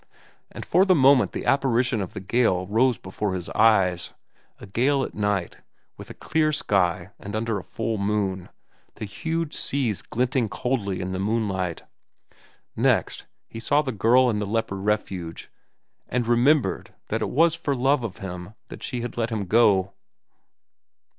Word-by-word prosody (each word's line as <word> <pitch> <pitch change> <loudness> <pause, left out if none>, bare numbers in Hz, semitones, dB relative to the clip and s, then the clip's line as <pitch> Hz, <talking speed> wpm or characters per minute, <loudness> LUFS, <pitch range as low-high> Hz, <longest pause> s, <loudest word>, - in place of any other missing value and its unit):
And - - -8
for 180 +3 +4
the 190 -2 +4
moment 135 -3 +5
the - - -5
apparition 120 -4 +2
of 95 - -6
the - - -3
gale 95 -2 +1
rose 115 +5 +2
before 95 +1 -4
his 90 -2 -5
eyes—a 95 -6 0
gale 135 +7 +1
at - - -5
night, 105 -4 -2 0.4
with - - -11
a - - -9
clear 155 -1 0
sky 95 - 0
and 100 +1 -7
under 110 -1 -1
a - - -10
full 110 -1 -3
moon, 100 -2 -1 0.5
the - - -6
huge 160 +10 -3
seas 120 -9 -1
glinting 125 -1 -1
coldly 110 -6 -2
in 90 0 -4
the 95 - -3
moonlight. 95 -4 -1 0.9
Next, - - 0 0.2
he 115 - -8
saw 145 +6 +2
the 130 - -3
girl 120 +4 +4
in 105 - -1
the 105 - -3
leper 110 -2 -1
refuge 95 -5 -3 0.6
and 125 -1 0
remembered 125 +5 +2 0.2
it - - -1
was 165 +3 +3
for 160 -4 -2
love 135 +1 +2
of 110 -5 -5
him 90 +2 -8
that - - -10
she 125 - -3
had 120 0 -6
let 115 -1 0
him 110 -4 -3
go. 100 -2 +3
110 Hz, 160 wpm, -24 LUFS, 95-130 Hz, 0.9 s, moment